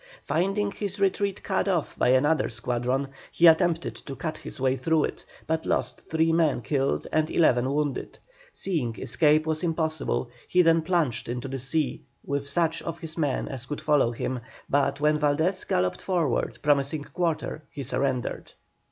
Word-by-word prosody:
Finding 195 +4 0
his 200 -1 -4
retreat 195 0 0
cut - - 0
off 175 -6 0
by - - +1
another 145 +5 +3
squadron, 125 +3 -1 0.2
he 170 - +3
attempted 170 0 +4
to 135 - -8
cut 155 +3 -4
his - - -9
way 130 0 +2
through 160 +2 +2
it, - - -4 0.2
but 160 0 -1
lost - - -2
three 160 0 +2
men 160 -7 +2
killed 135 +2 0
and 155 0 +1
eleven 130 -5 +3
wounded. 145 -2 -2 0.3
Seeing 145 - -2
escape 150 +6 +3
was 155 -1 -1
impossible, 160 -7 -1 0.2
he 180 0 +4
then 165 0 +4
plunged 155 -9 0
into 125 +2 -3
the 135 0 -4
sea 145 +4 -1 0.2
with 140 0 -2
such 165 +2 +1
of 165 0 -5
his 160 -2 -7
men 145 -5 0
as 130 -1 -6
could 150 - -4
follow 145 -6 +3
him, 125 +2 -3 0.3
but, 140 0 +1
when 150 +1 +3
Valdés 160 +6 +1
galloped 90 0 0
forward 170 -9 0
promising 145 +1 +2
quarter, 155 0 -2
he 140 - -6
surrendered. 130 0 -2
150 Hz, 165 wpm, -26 LUFS, 135-165 Hz, 0.3 s, attempted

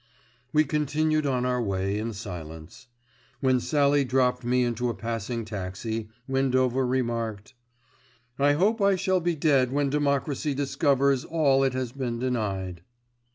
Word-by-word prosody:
We 155 0 +4
continued 155 +1 0
on 125 -2 0
our 125 -1 0
way 100 -1 -1
in 115 +1 -3
silence. 80 - -9 0.5
When 130 -1 +2
Sallie 145 +1 +2
dropped 130 -1 +1
me 125 +1 +2
into 120 0 -1
a 115 - -3
passing 115 0 -4
taxi, 110 +2 -5 0.2
Windover 130 -1 +1
remarked: 115 -3 -2 0.9
"I 145 +1 +4
hope 205 +8 +2
I 200 -1 +4
shall 185 0 +1
be 175 -1 0
dead 140 -5 +2
when 140 0 0
Democracy 145 0 0
discovers 140 -1 +2
all 145 -5 +2
it 135 -1 +1
has 130 -2 -3
been 125 -3 -3
denied." 100 -8 -2
130 Hz, 140 wpm, -26 LUFS, 115-145 Hz, 0.9 s, We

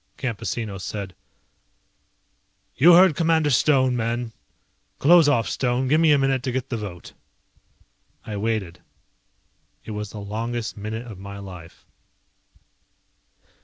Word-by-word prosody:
Campesino 110 -4 -4
said, 100 -2 -5 1.6
"You 170 +7 +7
heard 180 -3 +6
Commander 160 -3 +2
Stone, 130 -1 +3
men. 120 0 -2 0.7
Close 165 0 +6
off, 120 -5 +2
Stone, 125 0 -1
give 155 +3 +4
me 160 -2 +5
a 145 - +5
minute 135 -1 +1
to 130 - -3
get 130 +1 -3
the 120 - -2
vote." 100 -5 -8 1.1
I 105 - -5
waited. 105 -4 -3 1.0
It - - -7
was 105 -1 -5
the 105 - -8
longest 110 +3 -4
minute 110 +3 -5
of 110 -6 -10
my 100 +1 -8
life. 90 -4 -11
115 Hz, 125 wpm, -23 LUFS, 105-135 Hz, 1.6 s, You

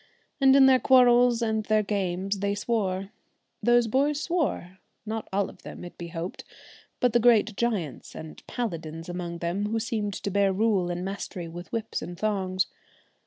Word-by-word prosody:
And 270 -1 +6
in 275 -1 +8
their 260 -1 +6
quarrels 245 -2 +5
and 220 -1 0
their 215 0 +2
games, 195 -1 -2
they 200 +1 0
swore 195 -3 -1 0.5
those 240 0 +4
boys 280 +6 +1
swore; 300 - -2 0.3
not 220 0 -4
all 195 0 +1
of - - -14
them - - -9 0.2
be 170 - -5
it - - -10
hoped, 170 +1 -6 0.6
but 245 -2 +2
the 240 - +5
great 225 -3 +4
giants 200 - -2
and 160 0 -9
paladins 165 -8 -4
among 175 -1 -4
them 175 +5 -2
who 225 +2 -1
seemed 215 -3 -2
to 200 - -4
bear 200 0 +3
rule 195 -3 +1
and 175 +1 -3
mastery 195 -2 -5
with 170 0 -9
whips 225 -1 -3
and 175 0 -7
thongs. 190 -3 0
205 Hz, 170 wpm, -27 LUFS, 180-235 Hz, 0.6 s, in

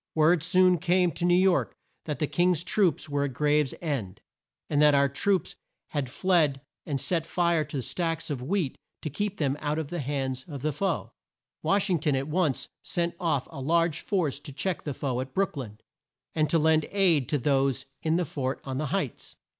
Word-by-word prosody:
Word 160 +1 +4
soon 180 +1 +4
came 180 0 +2
to 170 - -2
New 175 0 +5
York 185 -1 +2 0.3
that 150 -2 -3
the 150 - +1
King's 175 +1 +2
troops 180 -8 +1
were 145 -1 0
at 135 - -4
Graves 150 -1 +2
end, 115 - -3 0.5
and 145 - +1
that 150 -1 +6
our 140 0 +4
troops 180 +8 0 0.3
had 145 -4 -2
fled 155 -2 +2 0.3
and 140 -3 -1
set 165 +3 0
fire 170 -3 +2
to 145 0 -5
the 130 - -2
stacks 165 +2 -2
of 135 -4 -3
wheat 160 0 -1 0.2
to 155 - -3
keep 205 +5 -2
them 140 -5 +1
out 150 0 -1
of 160 -3 -3
the 175 - -3
hands 135 -2 -2
of 140 -5 -7
the 155 -1 0
foe. 190 +7 -2 0.5
Wash 200 -1 +2
ing 180 -3 +1
ton 150 -2 +1
at 135 +1 -1
once 155 -4 0 0.2
sent 170 -2 0
off 155 -7 0
a 140 -4 -7
large 165 +2 +2
force 165 -9 -1
to 145 - -9
check 180 +6 -2
the 145 -3 -5
foe 130 -3 -2
at 130 0 -8
Brook 195 -2 +1
lyn, 115 -7 -6 0.6
and 155 -2 +1
to 165 - +3
lend 155 0 +3
aid 175 - +3
to 150 - +2
those 135 -1 +1 0.2
in 160 0 +1
the 175 0 +1
fort 135 -2 -3
on 135 -1 -4
the 155 - -1
Heights. 145 - -3
155 Hz, 205 wpm, -27 LUFS, 140-175 Hz, 0.6 s, that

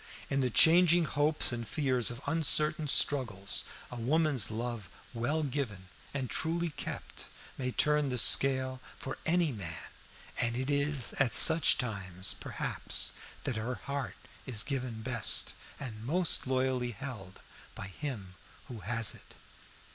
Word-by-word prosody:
In 135 0 +1
the 130 - +1
changing 170 +6 +6
hopes 150 0 +1
and 120 -2 -5
fears 130 -6 +1
of 120 +3 -7
uncertain 155 -1 +2
struggles, 115 -9 +2 0.3
a 125 - -7
woman's 140 +1 +2
love 115 -3 -5 0.2
well 135 +7 -1
given 125 -10 -4 0.2
and 135 -2 -3
truly 165 +5 -1
kept - - -6 0.3
may 125 -1 -3
turn 150 +1 +2
the 125 - -2
scale 130 +1 +4 0.2
for 135 - -7
a 170 -2 +2
man, 90 -8 -6 0.6
and 115 0 +1
it 130 +3 -2
is 140 -2 +1
at 130 -5 +2
such 160 -2 +6
times, 95 -5 -2
perhaps, - - 0 0.3
that 125 - -2
her 120 +3 -3
heart 140 +2 -5 0.3
is 110 -5 +2
given 125 -5 -4
best, 120 -3 +1 0.3
and 110 -6 -7
most 165 +3 +1
loyally 130 -2 0
held 105 -7 -9 0.4
by - - -6
him 100 -2 -7 0.4
who 120 -3 -7
has 115 +3 0
it. - - -15
130 Hz, 140 wpm, -31 LUFS, 115-145 Hz, 0.6 s, changing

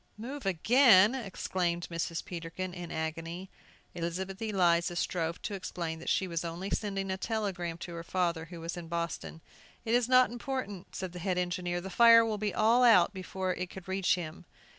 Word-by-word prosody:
"Move 255 +1 -6
again!" 215 - +6
exclaimed 185 -7 -2
Mrs. 165 0 -3
Peterkin, 175 +1 -5
in 175 -2 -7
agony. 165 +3 -4 0.4
Elizabeth 180 +4 -4
Eliza 175 -5 +2
strove 170 -1 -1
to 210 - -3
explain 170 -4 -4
that 165 - -5
she 190 - +1
was 170 -1 -2
only 170 +3 -5
sending 195 -2 -2
a 190 - -2
telegram 190 -6 -3
to 170 0 -7
her 170 - -5
father, 170 -2 -1
who 170 0 -10
was 165 +1 -5
in 175 -2 -7
Boston. 170 -1 -4 0.4
"It 225 - 0
is 245 0 +3
not 255 -1 +5
important," 240 -6 -5
said 185 -2 -4
the 180 - -8
head 185 0 -1
engineer; 175 0 -1
"the 190 +1 -7
fire 230 +3 +7
will 225 - -1 0.2
all 225 +3 +4
be 245 -2 +7
out 185 -1 +5
before 185 0 -3
it 180 0 -4
could 190 -1 -10
reach 190 -1 +2
him." 160 -3 -7
185 Hz, 185 wpm, -30 LUFS, 170-205 Hz, 0.4 s, fire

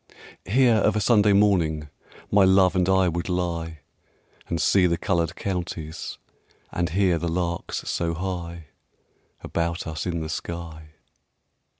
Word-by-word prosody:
Here 120 +2 +4
of 105 -1 +2
a - - +2
Sunday 105 -1 +4
morning 85 -7 +2 0.4
My 100 -1 +5
love 95 0 +4
and 90 0 +2
I 95 -1 +4
would 85 +1 -2
lie 85 -3 -2 0.7
And 85 - -2
see 95 +1 +4
the 85 -1 0
coloured 85 -1 -1
counties, 85 -4 -5 0.5
And 85 -1 -1
hear 90 -1 +2
the 85 - -2
larks 85 0 -3
so 85 -1 -1
high 85 -3 -5 0.7
About 85 +1 -2
us 80 +2 -4
in 85 -1 -1
the 80 - -4
sky. 80 -2 -6
85 Hz, 135 wpm, -24 LUFS, 85-95 Hz, 0.7 s, My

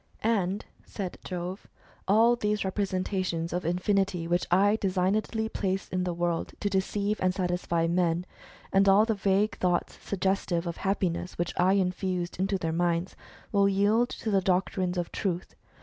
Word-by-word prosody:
" - - -24 0.2
And," 190 +3 -3 0.2
said 190 -4 -6
Jove, 180 +1 -5 0.2
" - - -29
all 225 +5 +5
those 210 -3 -1
representations 185 -3 -1
of 180 - -1
infinity 180 0 0
which 175 +1 0
I 200 +4 +4
designedly 200 +4 0
placed 195 -4 -3
in 185 0 0
the 175 - -1
world 175 -1 -1
to 205 - 0
deceive 200 +2 0
and 185 0 +1
satisfy 175 -2 0
men, 170 0 +1 0.5
and 195 0 +5
all 200 +3 +6
the 225 - +1
vague 200 +1 +1
thoughts 175 -1 0
suggestive 190 -3 -1
of 170 -1 -4
happiness, 185 -2 -1
which 175 0 -1
I 185 +2 +3
infused 180 -2 -1
into 195 +1 +1
their 165 -3 -2
minds, 170 +1 0 0.4
will 200 -1 +4
yield 210 +5 +3
to 220 - -4
the 195 -1 +3
doctrines 185 0 0
of 175 -1 -2
Truth. 180 -3 -3
185 Hz, 165 wpm, -28 LUFS, 175-200 Hz, 0.5 s, all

